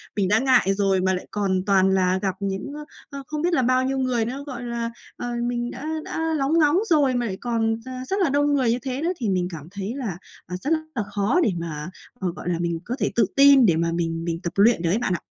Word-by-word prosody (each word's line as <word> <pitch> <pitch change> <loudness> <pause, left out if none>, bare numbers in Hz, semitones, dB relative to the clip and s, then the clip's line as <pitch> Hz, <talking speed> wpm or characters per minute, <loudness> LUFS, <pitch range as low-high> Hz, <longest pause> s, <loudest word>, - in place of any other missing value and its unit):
Mình 200 -3 +1
đã 210 +3 +3
ngại 255 -6 +3
rồi 195 -1 +1
mà 190 0 +2
lại 180 - -4
còn 190 -3 0
toàn 190 -2 +4
là 190 -1 +2
gặp 190 -2 -1
những, 195 +6 -3
ơ, 300 0 -7 0.2
ơ, 280 -1 -7
không 300 -1 -3
biết 350 +2 +1
là 315 - +3
bao 255 +1 +2
nhiêu 270 +1 -1
người 255 -3 0
nữa, 265 +4 -5
gọi 250 -3 -6
là, 235 -1 -3 0.3
ờ, 245 - -4 0.2
mình 240 0 -2
đã - - -8 0.2
đã 320 0 -2
lóng 275 +1 0
ngóng 300 +1 +4
rồi 285 -6 +3
mà 245 -1 0
lại 190 -4 -4
còn 225 -2 0
ra 255 0 -6
rất 390 - 0
là 330 - +2
đông 290 +1 +2
người 260 -5 +2
như 240 - 0
thế 260 +2 -4
nữa, 335 +3 +1
thì 230 -6 -2
mình 180 -2 +1
cảm 155 -3 -8
thấy 200 +2 -4
là, 225 -11 -4 0.3
à, 180 - -5
rất 290 - -2 0.2
là 225 - 0
khó 205 - +2
để 220 - +2
mà, 155 -1 -5 0.3
ờ, 185 -2 -1
gọi 170 - -5
là, 170 -1 -1
mình 170 -1 -1
có 245 - -3
thể - - 0
tự 235 - +4
tin 275 -2 +7
để 175 -6 +4
mà 165 +1 0
mình 165 -1 -2
mình 165 -1 -2
tập 170 - -3
luyện 210 -1 +4
được 170 - 0
ấy 190 - +2
bạn 240 -6 0
ạ. 170 - -1
230 Hz, 270 wpm, -23 LUFS, 185-265 Hz, 0.3 s, tin